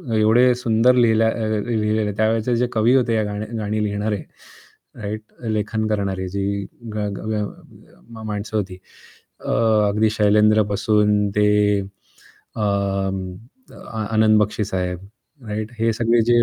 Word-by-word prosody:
एवढे 115 +4 +4
सुंदर 120 +1 +3
लिहिल्या 115 -2 +4
अ, - - 0
अ, 110 -2 -1
लिहिलेले 110 -1 0
त्यावेळचे 110 +2 +1
जे 125 +1 +1
कवी 115 +3 +3
होते 120 -3 +2
या 110 - +1
गाणी 105 +1 -4
गाणी 105 0 -2
लिहिणारे 105 -1 -2 0.8
राइट, 105 +1 -4 0.2
लेखन 110 0 -1
करणारे 100 -3 -2
जी 100 +1 -2 0.3
गा 105 -1 -2
गा 110 -1 -2 0.7
मा 110 -1 -9
माणसं 110 +1 -3
होती 95 -3 -3 0.7
अ, - - -3 0.4
अगदी 105 +1 +2
शैलेंद्र 105 0 +4
पासून 105 0 +2
ते 105 0 +4 0.3
अ, 100 +2 -14
अ, 100 - -3
आ 110 -1 -4
आनंद 110 0 +5
बक्षी 105 0 -1
साहेब 90 -2 -3 0.5
राइट? 105 +1 -4
हे 115 0 +2
सगळे 115 +1 +2
जे 120 0 +4
110 Hz, 140 wpm, -21 LUFS, 105-110 Hz, 0.8 s, आनंद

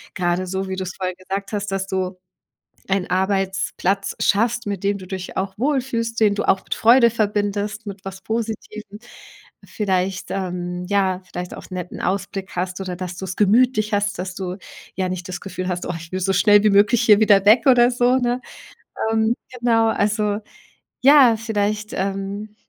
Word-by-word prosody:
grade 180 0 0
so, 190 +1 -3
wie 190 - -3
du 190 - -2
es 185 0 -6
vorhin 185 -1 -3
gesagt 195 +2 -5
hast, 205 -1 -3
dass 195 0 -2
du 185 -1 -2 0.7
einen 195 -1 0
Arbeitsplatz 190 +1 0
schaffst, 230 +2 +1
mit 200 -2 -4
dem 200 0 +1
du 190 - -10
dich 185 -1 -6
auch 190 +1 -3
wohlfühlst, 245 -3 -1
den 210 -2 +5
du 205 - -3
auch 190 - +2
mit - - -3
Freude 235 +1 +6
verbindest, 205 -1 -1
mit 200 -1 -8
was 195 0 -7
Positivem, 215 -1 -5 0.7
vielleicht, 190 -2 -2
ähm, 180 -1 -4
ja 190 -2 +1
vielleicht 180 0 -6
auch - - -10
'n - - -9
netten 180 -1 -6
Ausblick 195 +1 -3
hast 180 +1 -3
oder 185 -2 -4
dass 180 0 -6
du 190 - -5
es 185 -1 -5
gemütlich 215 +1 +3
hast, 205 0 0
dass 180 +1 -4
du 185 -1 -5 0.4
ja 185 -1 -1
nicht 180 0 -5
das 185 - -6
Gefühl 185 -2 -5
hast: 180 -1 -3
„Oh, 180 - -3
ich 165 0 -11
will 185 - -2
so 195 +1 +1
schnell 205 +2 +5
wie 215 - +5
möglich 205 +4 +4
hier 215 -3 +6
wieder 205 -3 +5
weg 225 +3 +6
oder 245 -1 +6
so“, 245 +1 +2
ne? 245 -1 0 0.7
Ähm, 220 +1 +2 0.2
genau, 230 -2 +3
also, 210 -1 0 0.6
ja, 270 -4 +7
vielleicht, 215 -1 -2
ähm, 195 +2 -4
200 Hz, 185 wpm, -21 LUFS, 185-215 Hz, 0.7 s, ja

